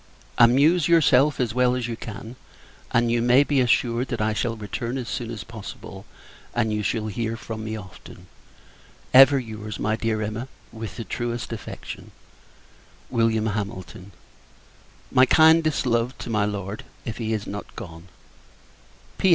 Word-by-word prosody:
Amuse 145 +8 +5
yourself 150 -4 +4
as 120 -3 0
well 125 0 +3
as 125 -2 -2
you 115 - -3
can; 115 +2 -8 0.5
and 115 0 +2
you 120 0 +2
may 125 +4 +5
be 145 -2 +2
assured, 120 0 +1
that 120 - -3
I 105 0 +1
shall 115 +1 -1
return 115 +4 -4
as 125 -3 -5
soon 115 -1 -4
as 110 -4 -6
possible, 100 -2 -10 0.5
and 110 0 +1
you 105 - -1
shall 110 +1 -1
hear 115 +2 -3
from 110 -1 -6
me 110 0 -4
often. 95 -4 -12 0.9
Ever 135 +2 +9
your's, 110 -4 -6
my 110 +1 0
dear 115 -1 -1
Emma, 110 +4 -4 0.2
with 110 -1 -7
the 115 - -4
truest 120 +3 -4
affection, 110 - -8 1.0
Wm. 115 -1 +2
HAMILTON. 100 -2 -6 1.0
My 130 0 +5
kindest 160 -1 +5
love 120 +1 0
to - - -6
my 105 -2 +2
Lord, 100 0 -4 0.2
if 115 - -5
he 115 -2 -3
is 110 -2 -2
not 105 +1 -7
gone. 85 -6 -9
115 Hz, 150 wpm, -24 LUFS, 110-125 Hz, 1.0 s, Ever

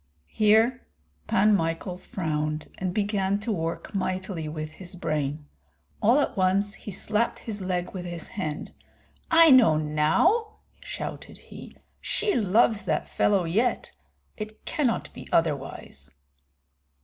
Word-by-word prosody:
Here 220 +4 +4 0.5
Pan 210 +2 +4
Michael 165 +1 -2
frowned, 155 -4 -3
and 185 -1 -1
began 200 0 0
to 225 - -2
work 165 +1 -3
mightily 185 -4 -2
with 155 0 -5
his 180 +2 -9
brain; 150 -3 -2 0.6
all 235 +7 +5
at 265 - -2
once 195 +2 +1
he - - -10
slapped 210 +4 -1
his 210 -3 -6
leg 180 -1 -2
with 180 -2 -5
his 170 -2 -6
hand. 155 -7 -5 0.6
"I 330 -2 +7
know 235 -12 +7
now," 155 - +2 0.2
shouted - - -7
he; - - -12 0.2
"she 425 -2 0
loves 215 0 +3
that - - -1
fellow 200 -3 +2
yet, 215 +9 0 0.5
it 215 0 -8
cannot 275 -8 -1
be - - -10
otherwise." 150 - -2
190 Hz, 125 wpm, -26 LUFS, 165-220 Hz, 0.6 s, I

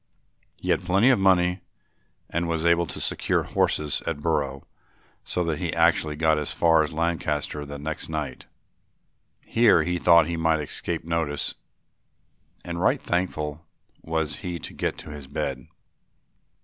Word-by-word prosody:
He - - -1
had - - +1
plenty 100 +8 +4
of 125 - +3
money 90 -1 +3 0.7
and 85 +1 -2
was 85 -1 -1
able 85 0 +3
to - - -7
secure - - 0
horses 75 -2 0
at 80 -3 -1
Brough 70 -4 -1 0.6
so 90 - -1
that 80 -3 -2
he 85 -3 -2
actually 80 -2 +3
got 80 0 +2
as 75 - -3
far 80 -1 +4
as 75 - -1
Lancaster 80 -3 -2
the 70 0 -6
next 80 +4 -4
night. 75 -5 -4 1.0
Here 115 -2 +4
he 90 0 -1
thought 85 -2 +6
he 85 +1 -3
might 80 -1 +2
escape 80 +2 -3
notice 80 -3 -1 1.1
and 85 0 -4
right 95 - +3
thankful 80 -4 -2 0.4
was 80 -2 -2
he 90 -3 -4
to 80 - -7
get - - -2
to - - -8
his 75 -2 -9
bed. 65 -2 -4
80 Hz, 150 wpm, -25 LUFS, 75-85 Hz, 1.1 s, thought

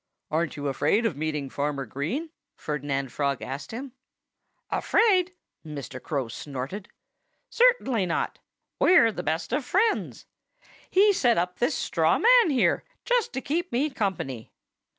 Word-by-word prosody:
"Aren't 160 0 -1
you 145 0 -3
afraid 150 - +1
of 200 - 0
meeting 150 -1 -2
Farmer 140 0 -2
Green?" 165 - -4 0.2
Ferdinand 140 -3 -3
Frog 140 0 -1
asked 135 +2 -6
him. 255 +4 -6 0.8
"Afraid?" 370 -5 +3 0.3
Mr. 140 -4 -7
Crow 140 -5 -2
snorted. 140 - -6 0.6
"Certainly 270 - +3
not! 170 - -2 0.4
We're 275 -11 +6
the 180 - -5
best 160 +6 -2
of 275 +2 0
friends. 415 - 0 0.6
He 405 +2 +5
set 245 -10 +2
up 180 +1 -1
this 245 +5 +1
straw - - +1
man 480 -5 +6
here, 265 -4 +2 0.2
just - - +1
to 265 - -3
keep 340 +6 -2
me 275 +5 0
company. 175 - -3
185 Hz, 135 wpm, -26 LUFS, -, 0.8 s, We're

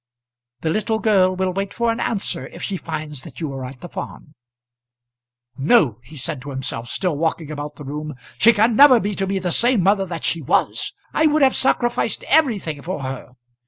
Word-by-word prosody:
The 160 - 0
little 220 +3 0
girl 190 -4 +3
will 185 0 -1
wait 195 +1 -3
for 235 -1 +1
an 230 - -3
answer 210 -4 -2
if - - -11
she 200 - -2
finds 155 -5 -5
that - - -11
you 155 -5 -3
are 135 -1 -5
at 130 0 -9
the 175 - -7
farm. 150 -2 -8 1.3
"No," 140 - +3
he 140 +6 -14
said 140 +1 -4
to 145 - -8
himself, 130 -4 -5
still 180 +2 -1
walking 160 0 -2
about 150 0 -6
the 150 - -10
room. 150 +1 -5 0.2
"She 230 - +7
can 225 +1 +2
never 270 -1 +8
be 205 -1 -2
to 195 0 -2
me 195 0 -1
the 180 -2 -2
same 240 0 +2
mother 195 0 +2
that 170 -2 -6
she 165 - 0
was. 135 - 0 0.2
I 315 - +4
would 300 -1 +3
have 265 - +4
sacrificed 240 -4 +1
everything 215 - +1
for 165 -4 -5
her. 130 -1 -6
180 Hz, 200 wpm, -21 LUFS, 145-215 Hz, 1.3 s, never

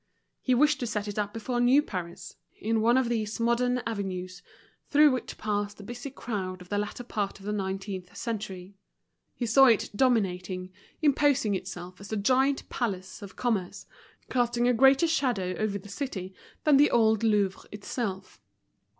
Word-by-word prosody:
He 255 - +2
wished 295 +2 +3
to 245 - -2
set 210 -2 -2
it 205 +1 -3
up 205 -1 -1
before 235 +3 -3
new 260 +4 +5
Paris, 175 - -6 0.2
in 220 +1 0
one 235 +3 +4
of 260 -2 +2
these 220 -2 -2
modern 245 +1 +1
avenues 185 -4 -4 0.5
through 295 0 +6
which 255 -2 -4
passed 205 -1 -2
the 205 - -10
busy 240 +6 -7
crowd 195 -8 -4
of 180 0 -13
the 205 - 0
latter 210 +4 -4
part 205 -5 -3
of 195 - -13
the 210 - -2
nineteenth 190 -1 -4
century. 200 -5 -5 0.6
He 245 - -2
saw 270 +4 +6
it 230 -5 +3
dominating, 185 -6 0 0.3
imposing 280 -6 +3
itself 185 -1 -6
as 200 - -9
the 220 - -3
giant 265 +6 +2
palace 190 -5 -4
of 200 -2 -10
commerce, 210 -7 -2 0.4
casting 240 -1 +1
a 250 - +4
greater 270 +6 +5
shadow 250 - 0
over 215 -2 0
the 200 - -12
city 200 -5 -5 0.3
than 300 -3 +5
the 290 +2 +6
old 220 -2 +3
Louvre 205 -4 +1
itself. 200 - -5
215 Hz, 165 wpm, -28 LUFS, 195-245 Hz, 0.6 s, through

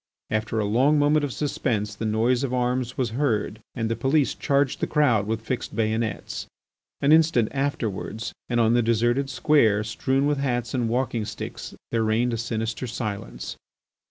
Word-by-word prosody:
After 110 +1 -1
a 105 - +1
long 130 +9 +3
moment 145 +1 +3
of 145 - -1
suspense 115 -7 -1
the 110 +1 -3
noise 120 +4 +2
of 130 -2 -1
arms 125 0 -1
was 125 -5 0
heard, 110 -4 -1
and 115 -2 -1
the 115 - -1
police 135 +5 +2
charged 140 -1 +1
the - - 0
crowd 120 -9 +2
with 110 0 -1
fixed 125 +2 -4
bayonets. 110 -1 -2 0.5
An 140 - +3
instant 155 -8 +4
afterwards 115 -6 -3 0.2
and 120 -1 +1
on 115 0 +4
the 120 - +4
deserted 120 +4 +1
square 120 -7 +3
strewn 130 +5 0
with 145 -1 +1
hats 120 -3 -1
and 120 -3 0
walking 120 -2 0
sticks 105 0 -7 0.2
there 115 - +1
reigned 115 +2 +1
a - - -1
sinister 115 +1 -3
silence. 110 -3 -5
120 Hz, 170 wpm, -25 LUFS, 110-135 Hz, 0.5 s, instant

